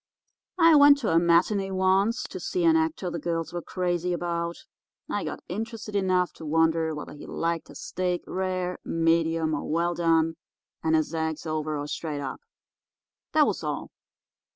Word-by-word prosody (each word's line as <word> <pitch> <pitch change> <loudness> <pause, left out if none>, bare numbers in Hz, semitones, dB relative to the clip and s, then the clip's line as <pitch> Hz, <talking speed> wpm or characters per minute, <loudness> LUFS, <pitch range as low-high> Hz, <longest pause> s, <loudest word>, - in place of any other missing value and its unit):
I 330 -2 +7
went 285 0 +8
to 225 - 0
a - - +5
matinée 180 +4 +3
once 190 +5 +2
to - - -7
see 365 -2 -2
an 325 -1 +6
actor 320 - 0
the 170 - -3
girls 165 +1 -3
were 175 - -3
crazy 180 0 -1
about. 170 -1 -2 0.5
I - - -2
got - - -5
interested 215 +2 -5
enough 185 -2 +1
to - - -10
wonder 160 0 +2
whether 150 - -7
he 145 - -11
liked 165 0 -2
his - - -10
steak 180 -1 -2
rare, 185 -1 -2
medium, 165 -1 +1
or 145 - -3
well 170 +2 +1
done, 165 -1 +2 0.5
and 160 0 +3
his 155 +1 0
eggs 160 -1 -2
over 155 -1 -2
or 145 - -3
straight 150 -1 -4
up. 135 -2 -5 0.9
That - - +6
was - - -2
all. - - -4
170 Hz, 170 wpm, -26 LUFS, 160-190 Hz, 0.9 s, went